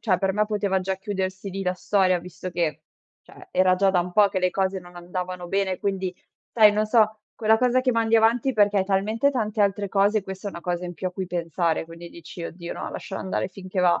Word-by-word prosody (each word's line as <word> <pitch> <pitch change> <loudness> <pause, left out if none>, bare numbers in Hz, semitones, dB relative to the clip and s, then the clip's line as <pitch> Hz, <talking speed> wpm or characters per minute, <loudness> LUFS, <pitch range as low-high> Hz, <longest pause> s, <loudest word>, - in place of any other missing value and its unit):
cioè 190 -6 +1
per 195 0 +1
me 210 +1 +2
poteva 205 -2 0
già 190 0 -2
chiudersi 190 -1 -4
lì 195 +1 -4
la 180 -1 0
storia 185 -1 +2
visto 180 +1 -8
che, 160 -3 -2 0.4
cioè, 370 - -16
era 185 - +4
già 195 +1 +3
da 180 - +3
un 180 +1 -5
po' 205 +1 +5
che 190 - -2
le 185 0 +1
cose 190 +1 0
non 175 -1 -14
andavano 180 0 -5
bene, 195 -1 0
quindi 190 -2 -2 0.4
sai, 215 -3 +7
non 215 +1 +1
so, 215 -1 +3
quella 220 -1 +3
cosa 250 +1 +3
che 255 0 +1
mandi 230 -1 +1
avanti 230 +4 +3
perché 205 -2 +3
hai 190 - +3
talmente 215 +7 +1
tante 215 -5 0
altre 200 0 0
cose 205 +2 +2
questa 190 +1 -7
è - - -5
una 170 - -8
cosa 175 +1 -2
in 175 - -5
più 185 - -4
a - - -10
cui 190 0 -4
pensare, 170 -1 -1
quindi 170 +1 -11
dici: 170 +1 -9
"Oddio 170 0 -7
no, - - -5
lascialo 195 - -6
andare 190 - -2
finché 185 0 -5
va". 175 -1 +3
190 Hz, 235 wpm, -24 LUFS, 180-210 Hz, 0.4 s, sai